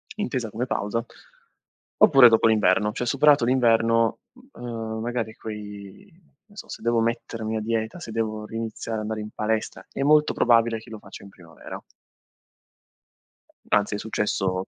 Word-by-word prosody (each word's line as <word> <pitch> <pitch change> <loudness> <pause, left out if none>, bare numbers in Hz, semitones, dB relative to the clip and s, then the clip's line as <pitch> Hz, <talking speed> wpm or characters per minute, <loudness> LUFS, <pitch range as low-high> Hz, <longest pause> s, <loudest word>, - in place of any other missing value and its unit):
intesa 130 - -3
come 115 +4 -3
pausa, 115 +1 -2 0.9
oppure 125 -3 +8
dopo 110 0 +4
l'inverno, 105 -1 +3
cioè 125 - -4
superato 140 0 +4
l'inverno, 115 -2 +2 0.4
ehm, 115 -2 -5
magari 115 -2 -3
quei 105 - -9 0.4
che 210 - -29
ne - - -19
so, - - -10
se - - -8
devo 115 0 +1
mettermi 115 -1 -2
a - - -1
dieta, 115 +7 -2
se 115 - -8
devo 110 -1 -3
riniziare 115 0 -5
a - - -3
andare 110 0 -4
in 105 - -7
palestra, 110 0 -2
è - - -5
molto 150 +1 +4
probabile 115 -1 +3
che - - -15
lo 110 - -8
faccia 100 0 -12
in 100 - -12
primavera. 85 -4 -11 1.9
Anzi, 105 0 +2
è - - -2
successo 95 -4 -2
115 Hz, 155 wpm, -24 LUFS, 105-120 Hz, 1.9 s, oppure